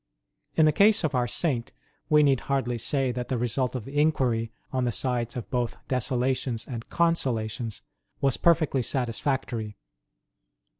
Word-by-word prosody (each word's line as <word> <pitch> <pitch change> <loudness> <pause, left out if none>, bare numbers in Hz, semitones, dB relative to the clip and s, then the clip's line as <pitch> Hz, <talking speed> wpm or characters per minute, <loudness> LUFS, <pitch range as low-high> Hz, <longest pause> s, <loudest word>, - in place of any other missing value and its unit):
In 160 - +5
the 155 - +5
case 210 +3 +4
of 155 - 0
our 125 -1 +1
Saint, 120 - -1 0.4
we 150 -1 +6
need 135 -3 +4
hardly 125 -3 0
say 135 +1 +1
that 125 0 -4
the 130 - -1
result 125 +2 0
of 120 -4 -4
the 145 +2 0
inquiry, 125 -7 +1 0.2
on 130 -1 +1
the 120 - +1
sides 120 0 -1
of 120 - -5
both 125 -2 -1
desolations 125 -1 -1
and 120 -3 -6
consolations, 120 -10 -1 0.4
was 135 -2 +2
perfectly 155 -6 +3
satisfactory. 120 -3 -2
125 Hz, 150 wpm, -27 LUFS, 120-140 Hz, 0.4 s, we